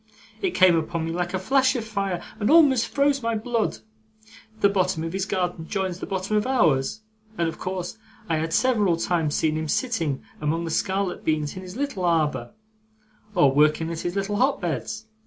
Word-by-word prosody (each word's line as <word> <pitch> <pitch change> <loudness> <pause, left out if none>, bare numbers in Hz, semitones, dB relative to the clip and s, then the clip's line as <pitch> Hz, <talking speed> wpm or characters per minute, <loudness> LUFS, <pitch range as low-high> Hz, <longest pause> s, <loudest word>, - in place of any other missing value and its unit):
It 380 -3 -1
came 185 -2 +6
upon 160 0 -1
me 165 - -3
like 175 +2 -2
a - - +2
flash 260 +8 +2
of 235 -3 -2
fire, 195 -5 -2 0.2
and 210 - +1
almost 285 -7 +5
froze 280 -1 +1
my 230 -1 -1
blood. 230 +1 -1 0.8
The - - +6
bottom 185 -5 0
of 165 +1 -4
his 195 0 -2
garden 180 -4 -2
joins 190 -3 -2
the - - -5
bottom 195 +2 -2
of 210 +3 +1
ours, 175 - +2 0.4
and 170 - +1
of 165 - -5
course 185 +3 -4 0.3
I 160 - +1
had 160 +1 -2
several 210 -9 +2
times 165 -3 0
seen 155 -1 +1
him 155 0 -2
sitting 165 - -1 0.2
among 160 +3 -1
the 165 - -4
scarlet 190 +2 -1
beans 155 -2 -1
in 185 - -6
his 185 +1 -9
little 275 -9 -2
arbour, 165 +3 0 0.8
or 140 - +5
working 155 +3 +3
at 165 - -4
his 175 +2 -3
little 200 +1 -1
hot 270 +4 +2
beds. 210 +5 -3
185 Hz, 195 wpm, -24 LUFS, 165-220 Hz, 0.8 s, came